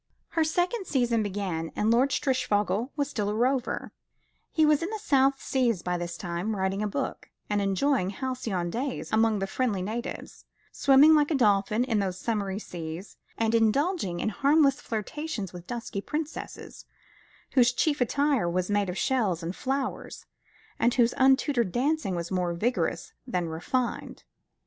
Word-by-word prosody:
Her 325 - +1
second 355 +6 0
season 240 -4 +1
began, 190 -5 -3
and 215 +2 +2
Lord 250 +4 +4
Strishfogel 215 -5 0
was 285 -2 0
still 210 -7 -2
a 210 - -2
rover; 250 +2 0 0.6
He 315 - +3
was 300 0 +4
in 335 - -2
the 440 - -3
South 275 -8 +3
Seas 235 -8 0
by 180 0 -1
this 175 -1 -4
time, 175 +4 -3
writing 190 +1 -1
a 210 - 0
book, 205 - -4 0.2
and 205 0 +2
enjoying 200 +2 +1
halcyon 205 -6 -3
days 260 +5 -3
among 220 0 +3
the 195 - -1
friendly 200 -2 -1
natives, 225 +5 -6 0.3
swimming 280 +3 +6
like 295 -1 +4
a 315 - +1
dolphin 210 -1 +3
in 230 -4 0
those 190 -2 -2
summery 200 -3 -2
seas, 170 -2 -7 0.2
and 225 0 +1
indulging 230 - +1
in - - 0
harmless 280 +4 +3
flirtations 225 - -4
with 175 -1 -10
dusky 230 -4 -4
princesses, 305 +6 -6 0.7
whose 245 -2 +5
chief 290 +2 0
attire 275 -5 +2
was 185 +3 -1
made 205 -2 +1
of 180 - -4
shells 205 -10 0
and 170 +3 -4
flowers, 270 0 -3 0.5
and 235 +1 +2
whose 240 -2 +3
untutored 265 - +3
dancing 275 - 0
was 170 +1 -4
more 180 -2 0
vigorous 240 +8 -1
than 180 -8 -1
refined. 235 +10 -3
230 Hz, 160 wpm, -27 LUFS, 195-270 Hz, 0.7 s, swimming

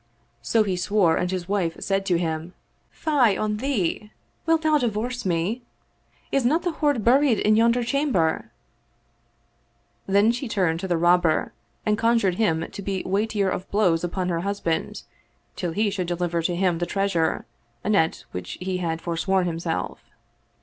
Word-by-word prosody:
So 220 - +2
he 195 -3 -1
swore 180 -2 +2
and 180 - -1
his 180 -2 -3
wife 190 -5 0
said 195 0 -1
to 180 -3 +3
him, 165 +1 -3 0.3
"Fie 265 - +2
on 210 0 -1
thee! 210 -5 -1 0.4
Wilt 325 0 +3
thou 310 -1 +3
divorce 240 -1 -2
me? 180 +8 -1 0.7
Is 275 - +2
not 300 +8 +2
the 350 - 0
hoard 290 -7 0
buried 260 0 +4
in 215 +1 +3
yonder 235 +2 +3
chamber? 240 - 0 0.8
" - - -42
Then 200 +3 +4
she 245 +3 -4
turned 180 -7 0
to 190 - -4
the 175 -2 +1
Rob 175 +2 +4
ber 160 -3 0 0.3
and 215 0 +1
conjured 230 -5 +2
him 165 -6 +1
to - - -7
be 195 -1 -3
weightier 200 0 0
of 185 - -4
blows 180 -6 +2
upon 180 +1 -2
her 170 -1 0
husband, 190 -3 -2 0.5
till 175 -2 -3
he 210 +4 0
should 185 -3 -3
deliver 175 -1 -1
to 175 +1 -1
him 175 -2 +1
the 175 - -1
treasure, 195 -4 0 0.4
anent 190 -6 +1
which 90 -1 -6
he 185 0 -2
had 165 -2 -2
forsworn 180 +2 0
himself. 165 -1 -3
195 Hz, 165 wpm, -24 LUFS, 175-225 Hz, 0.8 s, buried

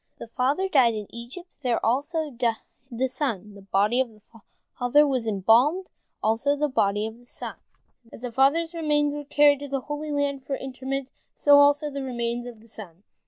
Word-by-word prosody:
The - - -9
father 275 +11 0
died 255 -10 +4
in 210 -1 -4
Egypt, 245 +10 -10
there 250 -4 +1
died - - -3
also 290 +4 -1 0.5
the 255 +1 -1
son. 235 -7 -3
The 200 - -13
body 200 +5 +1
of 260 - -2
the 215 -1 -20 0.6
father 270 +5 +4
was 260 -5 -1
embalmed, 235 - +3 0.3
also 230 +7 +2
the 300 +1 0
body 205 -5 +1
of 220 +1 -7
the 245 - -20
son. - - -7 0.5
As - - -12
the 245 - -4
father's 295 +7 +2
remains 295 -3 +1
were 295 0 -5
carried 290 0 +4
to 285 - -6
the 275 -1 -2
Holy 295 +2 -5
Land 285 -2 -1
for 275 - -3
interment, 265 0 -5 0.3
so 285 -1 +6
also 290 +1 +4
the 280 0 -4
remains 240 -2 -3
of 230 -3 -11
the 230 - -18
son. 195 -5 -12
265 Hz, 190 wpm, -25 LUFS, 230-290 Hz, 0.6 s, so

